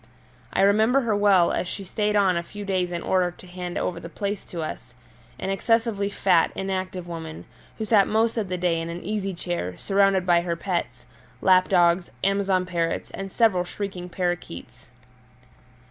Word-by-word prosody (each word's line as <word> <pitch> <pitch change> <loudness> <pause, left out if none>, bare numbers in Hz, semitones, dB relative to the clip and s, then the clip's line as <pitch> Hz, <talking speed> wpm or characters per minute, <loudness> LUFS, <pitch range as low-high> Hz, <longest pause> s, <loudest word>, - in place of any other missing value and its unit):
I - - +1
remember 220 +7 +4
her 225 -4 0
well, 200 -4 +4
as 180 - -1
she 195 - -5
stayed 210 +3 -1
on 195 -3 +4
a 170 - 0
few 205 +4 -8
days 185 -2 0
in 170 -1 -3
order 185 -1 +2
to 175 - -14
hand 180 -1 -6
over 170 -2 -2
the 170 - -9
place 200 +4 -3
to 170 -2 -5
us 125 -5 -7 0.4
an 195 - -3
excessively 220 0 +1
fat, 185 -4 +3
inactive 185 -2 -3
woman, 160 -2 -7 0.3
who 220 - -3
sat 205 -3 +4
most 225 +1 +2
of 215 -5 -2
the 180 - -2
day 175 -2 +1
in 165 - -5
an 170 +1 -6
easy 195 -1 -2
chair, 170 - -4
surrounded 195 -2 +2
by 175 -1 +4
her 170 -1 -2
pets 170 -9 -3 0.3
lap 185 -1 +4
dogs, 175 -1 +3
Amazon 195 -2 +2
parrots, 170 -2 -2
and 195 0 -6
several 205 -6 +3
shrieking 180 -1 -6
parakeets. 175 - -4
185 Hz, 175 wpm, -25 LUFS, 175-200 Hz, 0.4 s, remember